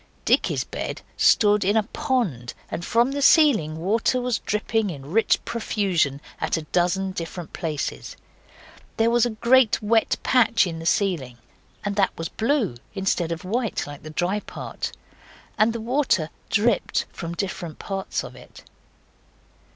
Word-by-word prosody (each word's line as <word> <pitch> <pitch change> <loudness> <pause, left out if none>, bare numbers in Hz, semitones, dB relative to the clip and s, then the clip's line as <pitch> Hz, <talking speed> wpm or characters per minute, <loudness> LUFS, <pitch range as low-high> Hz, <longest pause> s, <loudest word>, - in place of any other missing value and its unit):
Dicky's - - +2
bed - - -5
stood 210 -1 +4
in 205 +4 +2
a 220 - +3
pond, 195 - -2 0.2
and 175 - -4
from 235 +7 +2
the 285 +1 -2
ceiling 255 - +5
water 220 +8 +1
was 250 -2 -1
dripping 215 0 -1
in 140 -3 -8
rich 225 +4 +3
profusion 190 - 0 0.2
at - - 0
a 160 - -4
dozen 180 +4 0
different 170 -1 -6
places. 155 -4 -4 0.8
There 225 +1 +3
was 240 0 +4
a 220 -2 -7
great 240 0 +4
wet 225 +1 +2
patch 235 -4 +4
in 165 -2 -5
the 165 - -4
ceiling, 165 -12 0 0.5
and 205 0 -1
that 195 - +1
was 165 0 -4
blue, 225 - 0 0.2
instead 190 -3 0
of 165 +2 -4
white 230 +3 -1
like 145 -1 -9
the 155 - -9
dry 180 +6 -1
part, - - -6 0.6
and 215 +2 +3
the 230 - -4
water 230 - +1 0.2
dripped 220 -1 +1
from 170 0 -5
different 175 -4 -4
parts 195 -1 -3
of - - -9
it. - - -14
200 Hz, 150 wpm, -24 LUFS, 165-230 Hz, 0.8 s, ceiling